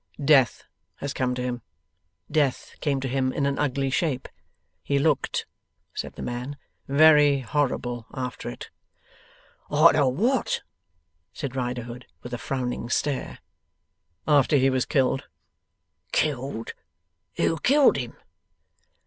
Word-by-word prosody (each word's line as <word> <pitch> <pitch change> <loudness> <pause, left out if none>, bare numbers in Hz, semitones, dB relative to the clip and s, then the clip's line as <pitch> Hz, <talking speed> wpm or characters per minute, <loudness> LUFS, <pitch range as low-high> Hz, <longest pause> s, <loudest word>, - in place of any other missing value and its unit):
'Death 135 -5 +4 0.3
has 140 - -5
come 125 -1 -1
to 125 - -3
him. 125 -1 -3 0.7
Death 145 -4 0
came 140 -3 0
to 135 - -3
him 130 0 0
in 140 - -1
an 140 0 0
ugly 135 -1 0
shape. 135 -3 0 0.5
He 140 - 0
looked,' 145 -1 +1 0.5
said - - -5
the - - -7
man, 125 +4 -4 0.3
'very 145 -1 +6
horrible 125 -3 -1
after 125 -1 -5
it.' - - -9 1.0
'Arter 150 -1 +5
what?' 230 - +1 0.7
said 135 -2 -5
Riderhood, 125 -1 -4 0.2
with 125 - -8
a 120 - -3
frowning 125 -3 -3
stare. 140 +2 -1 0.9
'After 145 -1 +4
he 135 0 +3
was 130 -1 0
killed.' 135 -1 +1 0.9
'Killed? 135 -5 -1 0.6
Who 165 - +1
killed 280 - +5
him? 125 -3 -5
135 Hz, 120 wpm, -25 LUFS, 125-145 Hz, 1.0 s, very